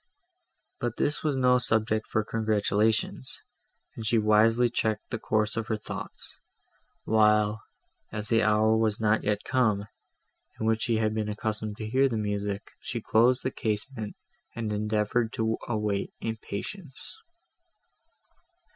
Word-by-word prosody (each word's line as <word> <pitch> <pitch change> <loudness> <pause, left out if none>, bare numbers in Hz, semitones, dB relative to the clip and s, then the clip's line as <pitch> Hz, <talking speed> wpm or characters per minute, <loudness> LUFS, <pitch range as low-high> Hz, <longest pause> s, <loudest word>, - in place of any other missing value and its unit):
But 120 -1 -2
this 145 - 0
was 150 -3 +1
no 125 -1 +4
subject 110 -2 0
for 110 - 0
congratulations, 110 - 0 0.6
and 115 - -6
she 115 +2 +2
wisely 110 +3 +4
checked 110 -2 -1
the 115 - -2
course 110 0 0
of 115 -1 -2
her 110 - 0
thoughts, 105 - -8 0.6
while, 105 0 +3 0.5
as 105 0 -2
the 115 -1 +4
hour 110 0 +4
was 110 -2 +1
not 110 0 +2
yet 105 0 0
come, 110 -6 +2 0.7
in 110 - -2
which 110 0 +2
she 115 -1 +1
had 110 -1 +1
been 110 -1 -1
accustomed 105 0 -3
to 110 - -5
hear 135 +4 +3
the 115 - -2
music, 105 -1 -3
she - - -4
closed 125 +3 +3
the 130 - -1
casement, 110 0 -3 0.4
and 110 -2 -2
endeavoured 105 +2 0
to 110 0 0
await 105 -3 -1
it - - -5
in 110 - -3
patience. 135 - -6
110 Hz, 145 wpm, -28 LUFS, 105-115 Hz, 0.7 s, no